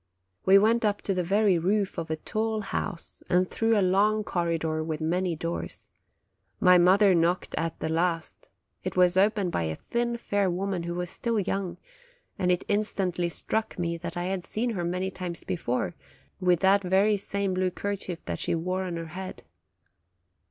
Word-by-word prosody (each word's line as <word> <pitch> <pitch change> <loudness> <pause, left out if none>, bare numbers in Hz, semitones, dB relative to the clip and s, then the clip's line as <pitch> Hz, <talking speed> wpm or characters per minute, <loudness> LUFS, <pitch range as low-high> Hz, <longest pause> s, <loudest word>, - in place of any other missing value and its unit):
We 195 +1 +8
went 225 +3 +3
up 205 -1 0
to 195 - 0
the 180 -1 0
very 195 0 +3
roof 195 +1 0
of 165 -1 -5
a 160 - 0
tall 215 +6 -2
house, 185 -4 -4
and 180 +1 +3
through 225 +2 +1
a 195 - +3
long 210 +3 +3
corridor 165 -4 -1
with 155 -1 -3
many 175 +2 0
doors. 165 +2 -4 0.7
My 180 -1 +6
mother 190 +3 +6
knocked 175 +1 +1
at 165 -1 -2
the - - -2
last; 165 - -1 0.3
it - - -4
was 180 0 +5
opened 200 -1 +2
by - - 0
a 80 -1 -2
thin, 235 - -2
fair 205 -4 0
woman 185 0 -2
who 170 0 -4
was 180 0 -3
still 230 -2 -1
young, 195 -2 -2 0.6
and 180 -2 +2
it 180 - +1
instantly 195 -4 0
struck 220 +6 -2
me 170 -1 -1
that 170 +1 -6
I 175 - -1
had 185 0 -2
seen 235 +5 -2
her 185 -6 -2
many 180 +2 -1
times 180 -2 -6
before, 125 - -2 0.5
with 180 -2 +3
that 195 +1 +5
very 195 +3 +3
same 200 -1 -2
blue 185 0 +1
kerchief 190 -2 -5
that 85 -1 -3
she - - 0
wore 185 +3 -2
on 175 -2 -4
her 165 - -4
head. 190 +1 -7
185 Hz, 180 wpm, -27 LUFS, 170-200 Hz, 0.7 s, We